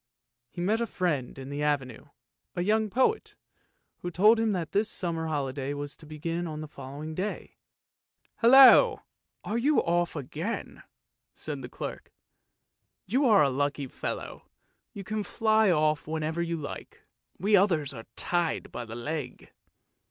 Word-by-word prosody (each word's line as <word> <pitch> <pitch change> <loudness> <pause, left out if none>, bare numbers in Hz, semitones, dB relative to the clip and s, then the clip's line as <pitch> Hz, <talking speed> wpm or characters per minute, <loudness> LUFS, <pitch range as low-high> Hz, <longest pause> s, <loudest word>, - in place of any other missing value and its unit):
He 175 - -7
met 215 +6 +1
a 235 - 0
friend 155 - -2
in 135 +1 -8
the 145 +1 -3
Avenue, 140 -5 -1 0.5
a 175 - -1
young 215 +2 +2
poet, 260 - +1 0.6
who 175 - -4
told 210 +6 +5
him 225 -1 +2
that 170 -4 -4
his 210 +2 +1
summer 165 -4 -2
holiday 140 -2 -2
was 145 0 -6
to 155 - -14
begin 165 +3 -4
on 155 -1 -5
the 155 - -6
following 145 +2 -8
day. 190 +6 -5 0.4
" - - -42
Hallo! 260 +3 +8 0.4
are 225 +3 -2
you 290 +4 +2
off 175 0 +1
again? 155 - -5 0.3
" - - -58
said - - -5
the - - -8
clerk. - - -7 0.5
" - - -55
You 265 +2 +2
are 210 -8 +6
a 140 - +2
lucky 145 +1 -1
fellow. 130 - -6 0.4
You 200 - -8
can 215 +2 -3
fly 220 -1 +2
off 155 -3 +1
whenever 160 +1 -2
you 170 0 -2
like, 145 -2 -8 0.3
we 205 +3 +3
others 170 -8 +2
are 115 -3 -10
tied 175 -2 -1
by 120 - -5
the 115 0 -8
leg! 145 +2 -5
165 Hz, 160 wpm, -28 LUFS, 145-210 Hz, 0.6 s, Hallo